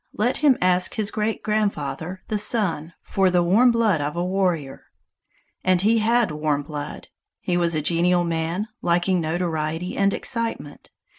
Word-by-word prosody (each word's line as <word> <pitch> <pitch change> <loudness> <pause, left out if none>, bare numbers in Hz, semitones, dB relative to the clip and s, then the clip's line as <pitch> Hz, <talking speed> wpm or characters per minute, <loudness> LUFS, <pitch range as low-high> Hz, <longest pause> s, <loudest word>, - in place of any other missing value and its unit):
Let 240 +4 +1
him 290 -4 +3
ask 180 0 +2
his 215 -1 -1
great 215 0 -2
grandfather, 185 -5 -2
the 215 - -1
Sun, 185 -7 +2
for 195 -1 +1
the 175 -1 +2
warm 215 +9 +4
blood 225 -9 +2
of 145 +2 -3
a 175 +1 -1
warrior!" 180 -7 -2 0.8
And 185 -1 +3
he 225 +2 +3
had 230 -2 +2
warm 150 -1 -1
blood. 145 0 -7 0.3
He 180 - -2
was 170 -2 +1
a 155 - -1
genial 175 +2 +2
man, 170 +4 -2
liking 175 +1 +1
notoriety 160 +1 -2
and 200 0 +2
excitement. 230 - -4
180 Hz, 155 wpm, -23 LUFS, 160-210 Hz, 0.8 s, warm